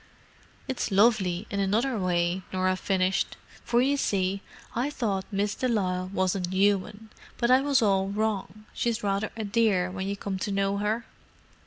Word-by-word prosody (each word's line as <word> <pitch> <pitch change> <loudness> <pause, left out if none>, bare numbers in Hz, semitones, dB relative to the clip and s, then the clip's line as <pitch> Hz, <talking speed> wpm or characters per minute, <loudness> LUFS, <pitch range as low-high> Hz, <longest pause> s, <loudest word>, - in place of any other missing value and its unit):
"It's 260 - -2
lovely 200 -3 +3
in 200 - -1
another 220 +7 +1
way," 175 0 +1
Norah 185 0 +1
finished. 185 0 0 0.3
"For 240 +1 +2
you 280 +2 +2
see, 195 -5 0 0.3
I 245 +5 0
thought 205 -9 -2
Miss 205 +1 0
de 255 - -1
Lisle 185 -5 0
wasn't 185 -1 0
human, 205 +3 +1 0.3
but 235 +1 +2
I 260 +1 +6
was 275 -3 +3
all 195 -2 +2
wrong. 215 +1 -2
She's 235 -2 -1
rather 200 +1 0
a 220 - -2
dear 200 -4 +2
when 190 0 -4
you 200 0 -2
come 195 -1 -4
to 200 - -2
know 195 0 +1
her." 215 +3 -1
200 Hz, 165 wpm, -27 LUFS, 190-220 Hz, 0.3 s, I